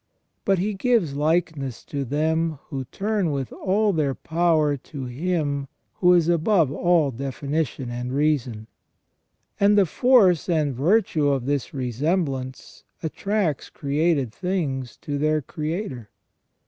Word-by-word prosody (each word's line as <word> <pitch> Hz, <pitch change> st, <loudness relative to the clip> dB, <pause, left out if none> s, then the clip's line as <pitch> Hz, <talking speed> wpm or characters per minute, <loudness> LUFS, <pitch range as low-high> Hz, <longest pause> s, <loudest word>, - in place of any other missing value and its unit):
But 195 Hz, -1 st, +3 dB
He 205 Hz, +4 st, -1 dB
gives 200 Hz, -, +1 dB
likeness 150 Hz, -5 st, -1 dB
to 140 Hz, -1 st, -3 dB
them 160 Hz, +4 st, 0 dB
who 135 Hz, -2 st, -4 dB
turn 200 Hz, -, -1 dB
with 135 Hz, -3 st, -3 dB
all 205 Hz, +2 st, +1 dB
their 145 Hz, -5 st, 0 dB
power 160 Hz, -3 st, +1 dB
to 135 Hz, 0 st, -8 dB
Him 145 Hz, +1 st, -2 dB, 0.3 s
who 180 Hz, -1 st, +5 dB
is 170 Hz, -2 st, +4 dB
above 170 Hz, -2 st, +3 dB
all 165 Hz, -2 st, +2 dB
definition 140 Hz, 0 st, -3 dB
and 125 Hz, +1 st, -4 dB
reason; 135 Hz, -6 st, 0 dB, 0.9 s
and 205 Hz, +1 st, +4 dB
the 200 Hz, -, +6 dB
force 190 Hz, -, +4 dB
and 155 Hz, -5 st, +1 dB
virtue 160 Hz, -, +2 dB
of 135 Hz, -3 st, 0 dB
this 140 Hz, -2 st, -1 dB
resemblance 135 Hz, -, -2 dB, 0.2 s
attracts 185 Hz, -1 st, -1 dB
created 145 Hz, -3 st, 0 dB
things 150 Hz, -9 st, -3 dB
to 145 Hz, -1 st, -3 dB
their 155 Hz, +1 st, +2 dB
Creator. 150 Hz, -, -5 dB
155 Hz, 125 wpm, -24 LUFS, 135-180 Hz, 0.9 s, the